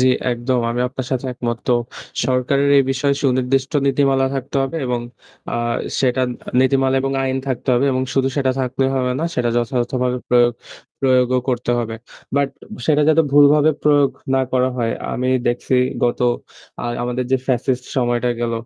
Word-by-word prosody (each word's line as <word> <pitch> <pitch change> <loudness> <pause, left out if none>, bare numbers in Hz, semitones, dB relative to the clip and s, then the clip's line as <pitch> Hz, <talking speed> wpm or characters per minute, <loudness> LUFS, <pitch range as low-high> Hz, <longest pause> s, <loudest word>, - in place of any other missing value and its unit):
জি, 130 - +4 0.2
একদম। 120 +1 -1
আমি 120 +1 -2
আপনার 130 -1 -6
সাথে 130 +1 -2
একমত। 120 -1 -3
তো 125 - +3 0.5
সরকারের 130 +2 +1
এই - - +5
বিষয়ে 140 +1 +1
সুনির্দিষ্ট 130 +1 +1
নীতিমালা 135 -1 +2
থাকতে 135 +1 -4
হবে 135 +5 -3
এবং 125 -1 -1 0.5
আ - - -2 0.5
সেটা 130 -1 +1 0.4
নীতিমালা 135 0 +2
এবং 135 0 -1
আইন 130 0 -1
থাকতে 130 +1 -4
হবে; 120 - +2
এবং 130 - 0
শুধু 135 -1 +2
সেটা 135 -2 +2
থাকলেই 130 +1 0
হবে 125 -1 0
না, - - 0
সেটা 120 -1 0
যথাযথভাবে 125 +1 -1
প্রয়োগ 120 -1 +4 0.5
প্রয়োগও 130 -1 +3
করতে 125 -1 -1
হবে। 115 -1 -3 0.4
বাট 140 -1 +2 0.4
সেটা 150 -1 +3
যাতে 160 +1 +5
ভুলভাবে 145 +1 +6
প্রয়োগ 145 -2 +4 0.2
না 135 - +3
করা 130 0 +2
হয়। 115 -1 0 0.2
আমি 130 +1 -1 0.2
দেখছি 120 +2 0 0.3
গত 120 - 0 0.6
আ - - -4 0.2
আমাদের 125 +1 -2
যে - - +5
ফ্যাসিস্ট 125 0 0
সময়টা 120 -1 +1
গেল, 120 -1 -1
130 Hz, 165 wpm, -19 LUFS, 125-135 Hz, 0.6 s, ভুলভাবে